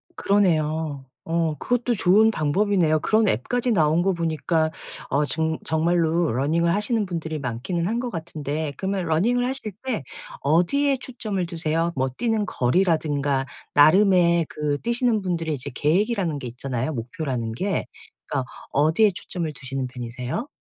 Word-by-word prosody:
그러네요. 155 -7 +1 0.2
어 165 -2 0
그것도 245 -1 0
좋은 205 +4 +5
방법이네요. 170 -2 +2
그런 215 +5 +2
앱까지 245 - 0
나온 160 -2 +3
거 195 - +2
보니까 160 -1 0 0.4
어 145 +2 +2
증 160 +1 -1
정말로 165 0 +1
running을 160 +7 +1
하시는 210 +1 +1
분들이 160 -3 -4
많기는 140 +8 -2
한 230 +3 -1
것 245 -1 -3
같은데 155 -3 -4
그러면 195 0 -1
running을 225 +10 +2
하실 260 -5 -2
때 255 - -2 0.4
어디에 220 - +2
초점을 215 -7 -3
두세요? 165 0 -1
뭐 130 0 0
뛰는 220 - -1
거리라든가 145 -3 +1 0.3
나름의 170 +1 +5
그 145 -1 -2
뛰시는 235 -2 +1
분들의 165 -4 -1
이제 130 -3 -4
계획이라는 180 - +1
게 125 - -6
있잖아요 125 +3 -3
목표라는 120 -1 -3
게. 190 - -1 0.4
그러니까 130 -3 -2 0.2
어디에 160 +9 +4
초점을 165 -4 -4
두시는 135 -1 -4
편이세요? 125 - -5
165 Hz, 375 characters per minute, -24 LUFS, 145-200 Hz, 0.4 s, 좋은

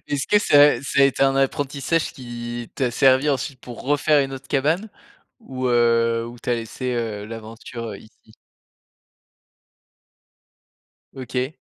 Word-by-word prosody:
Est-ce 140 -1 -2
que 210 - +4
ça 145 -8 +5
ça 140 +1 0
a - - +8
été 135 0 +1
un 135 0 +3
apprentissage 140 +3 0
qui, 120 -3 -7
t'a 130 -2 0
servi 130 +4 +4
ensuite 135 -1 -3
pour 120 -2 -10
refaire 145 +2 +3
une 135 0 -5
autre 135 0 -10
cabane? 155 +10 0 0.5
Ou, 130 - -5
heu, 115 -1 +2
ou 120 +1 -10
tu 125 - -4
as - - +3
laissé, 120 +2 -4
heu, 110 -3 -3
l'aventure, 115 +1 -8
heu, 100 - -7
ici? 110 0 -20 2.8
OK. 130 +2 -4
130 Hz, 145 wpm, -22 LUFS, 120-140 Hz, 2.8 s, a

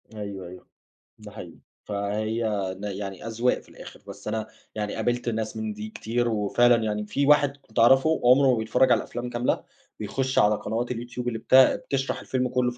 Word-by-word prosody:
أيوه، 100 -3 -6
أيوه، 90 +1 -12 0.5
ده - - -11
حقيقي، - - -10 0.3
فهي 105 +3 -2 0.4
ن - - -10
يعني 100 0 -5
أذواق 115 +2 0
في - - -20
الآخر، - - -12
بس - - -10
أنا 110 0 -2 0.3
يعني 105 -1 -3
قابلت 120 0 -1
ناس 110 -1 -3
من 110 -1 -3
دي 105 +1 -7
كتير، 120 +2 -2
وفعلًا 115 +2 +3
يعني 105 -1 -2
في 140 +7 -1
واحد 145 -1 +4
كنت 140 - -6
أعرفه، 135 +7 +5
عمره 130 +2 +6
ما 120 - +1
بيتفرّج 125 +3 +2
على 120 - +6
الأفلام 120 +2 -5
كاملة، 120 +1 -1 0.4
بيخش 130 +5 -1
على 105 +1 +4
قنوات 115 +4 -3
اليوتيوب 120 +1 -5
اللي 115 -2 -2
بت 130 - +2
بتشرح 135 +1 +3
الفيلم 125 -1 -1
كلّه 125 -1 +1
في 120 - -13
115 Hz, 190 wpm, -25 LUFS, 105-125 Hz, 0.5 s, عمره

